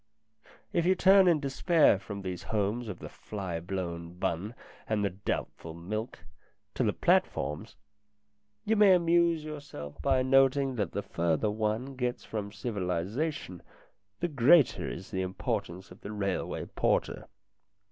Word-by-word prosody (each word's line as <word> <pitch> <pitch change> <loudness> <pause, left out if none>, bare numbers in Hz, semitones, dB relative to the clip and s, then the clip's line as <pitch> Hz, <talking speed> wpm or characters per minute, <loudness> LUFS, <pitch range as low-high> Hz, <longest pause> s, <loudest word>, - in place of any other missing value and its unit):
If 170 - +2
you 190 - +5
turn 190 +1 +6
in 170 -3 +4
despair 145 - +3
from 100 0 -7
these 90 -2 -4
homes 110 +3 -1
of 100 -5 -5
the - - -8
fly 95 -5 -5
blown 85 -1 -5
bun 90 +6 -2 0.3
and 105 -2 +1
the 100 - 0
doubtful 90 -4 -4
milk, 110 +8 -5 0.5
to - - 0
the - - +2
platforms, 75 +4 0 0.9
you 220 - +2
may 205 -3 +7
amuse 170 -2 +3
yourself 145 - -8
by 130 -2 +2
noting 135 +1 +4
that 100 -6 -2
the - - -2
further 85 +5 0
one 110 +5 -2
gets 125 -1 -2
from 105 -2 -4
civilization, 100 - -3 0.6
the 175 - +1
greater 145 0 +4
is 95 - -8
the 95 - -1
importance 95 0 -4
of 90 - -14
the 105 - -7
railway 100 -3 -2
porter. - - -1
110 Hz, 140 wpm, -30 LUFS, 95-140 Hz, 0.9 s, may